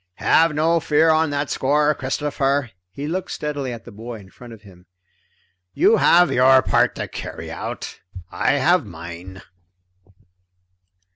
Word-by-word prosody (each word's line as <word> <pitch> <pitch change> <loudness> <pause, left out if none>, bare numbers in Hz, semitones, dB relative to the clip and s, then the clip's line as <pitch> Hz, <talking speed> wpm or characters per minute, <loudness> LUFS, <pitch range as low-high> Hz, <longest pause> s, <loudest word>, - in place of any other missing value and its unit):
"Have 160 -1 +2
no 165 +2 +2
fear 160 0 +3
on 160 0 +2
that 145 0 -3
score, 150 +2 +2
Christopher." 135 -1 -2 0.2
He 140 +9 -7
looked 180 +4 -3
steadily 145 -3 -4
at 115 -1 -9
the 120 - -11
boy 115 +2 -9
in 95 -2 -16
front 120 -1 -13
of 110 -2 -13
him. 90 -3 -18 0.9
"You 225 - +4
have 175 -2 +4
your 130 0 +5
part - - +2
to - - -5
carry - - -8
out, - - -7 0.3
I - - +1
have 160 +6 +2
mine." 85 0 -10
140 Hz, 145 wpm, -21 LUFS, 115-150 Hz, 0.9 s, your